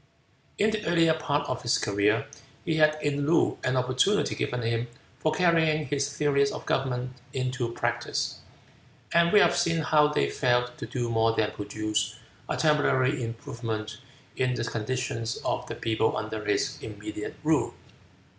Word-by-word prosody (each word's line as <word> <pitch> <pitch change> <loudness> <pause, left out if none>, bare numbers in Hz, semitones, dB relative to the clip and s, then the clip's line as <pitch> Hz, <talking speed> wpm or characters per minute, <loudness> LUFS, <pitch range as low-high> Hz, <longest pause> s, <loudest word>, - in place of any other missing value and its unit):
In 215 +2 +3
the 215 -1 -2
earlier 165 -1 +4
part 150 -2 -1
of - - -3
his 120 - +2
career, 105 +2 +1 0.4
he 160 -1 0
had 155 0 +4
in 145 0 0
Loo 165 - +3
an 130 0 +1
opportunity 130 +12 +2
given 125 -1 -2
him 115 +1 -1 0.3
for 155 - +1
carrying 160 -2 +2
his 140 +1 -1
theories 140 -1 +2
of - - -7
government 125 -1 -1 0.2
into 125 -2 -2
practice, 120 0 -2 0.7
and 170 0 +4
we 210 - +7
have - - +4
seen 165 -1 +1
how 150 0 +4
they 150 - +1
failed 125 -2 +1
to - - -5
do 120 -2 -2
more 115 0 +2
than 105 -1 +1
produce 105 +1 -2 0.3
a - - -1
temporary 145 -3 +2
improvement 115 -1 -5 0.4
in 125 -1 +1
the - - -2
condition 115 +1 -2 0.2
of - - -1
the - - -5
people 110 -1 0
under - - -4
his 400 -1 0
immediate 335 +7 -6
rule. - - +1
130 Hz, 155 wpm, -27 LUFS, 115-155 Hz, 0.7 s, we